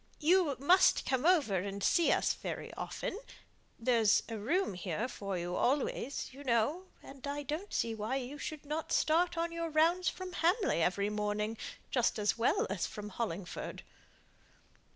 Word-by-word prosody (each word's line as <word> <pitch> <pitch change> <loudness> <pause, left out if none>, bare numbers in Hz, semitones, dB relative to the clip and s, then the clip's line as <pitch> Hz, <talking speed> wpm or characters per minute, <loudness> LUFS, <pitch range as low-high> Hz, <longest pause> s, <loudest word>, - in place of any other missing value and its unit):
You 325 -2 +3
must 350 +8 +5
come 260 +4 +1
over 290 - +4
and 200 +1 -4
see 340 -2 +4
us - - +2
very - - -6
often. 395 - -4 0.6
There's 230 -3 +3
a 225 - -5
room 265 - 0
here 180 +5 -3
for 200 -6 -4
you 175 +1 -3
always, 270 0 -1
you 280 +2 -10
know; 275 +9 +1 0.2
and 275 0 -9
I 290 +1 -3
don't 310 +8 -4
see 230 - 0
why 220 +4 -2
you 270 +2 -4
should 305 0 -6
not 305 +2 -3
start 340 +2 +2
on 335 0 0
your 335 0 -3
rounds 330 +4 +3
from 370 -1 -7
Hamley 350 - +2
every 200 +4 +1
morning, 210 +1 -1 0.4
just 245 -3 +2
as 210 -1 +1
well 230 +1 +2
as 195 -2 -2
from 210 -1 -7
Hollingford." 195 -4 -5
260 Hz, 160 wpm, -33 LUFS, 210-325 Hz, 0.6 s, must